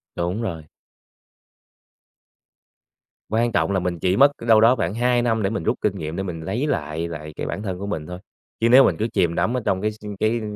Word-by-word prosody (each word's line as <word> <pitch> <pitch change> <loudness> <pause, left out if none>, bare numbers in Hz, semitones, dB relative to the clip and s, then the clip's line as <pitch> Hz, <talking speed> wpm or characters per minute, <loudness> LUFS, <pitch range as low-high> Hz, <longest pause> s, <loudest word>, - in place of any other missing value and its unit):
Đúng 90 +6 -2
rồi. 85 -8 -4 2.7
Quan 115 +2 +1
trọng 85 -1 +1
là 95 -1 +1
mình 90 -1 -2
chỉ 90 +3 +1
mất 140 +4 +6 0.2
đâu 110 -2 +6
đó 115 +3 +5
khoảng 105 - -2
2 120 +1 +2
năm 115 -2 0
để 95 - 0
mình 110 - -3
rút - - +1
kinh - - -1
nghiệm, 80 +1 -5
để 95 - -2
mình 90 -4 -5
lấy 100 - -2
lại 80 - -2
lại 75 -2 -7
cái - - -4
bản 105 - -4
thân 95 -4 -4
của 100 - -5
mình 80 -7 -4
thôi. 90 0 -7 0.4
Chứ 115 - +3
nếu 130 +3 +8
mình 85 - +2
cứ 110 - 0
chìm 85 -2 +1
đắm 120 +8 0
ở - - -1
trong 95 - 0
cái 105 - +1
s - - -14 0.2
cái, 110 +2 +1
100 Hz, 225 wpm, -22 LUFS, 85-115 Hz, 2.7 s, nếu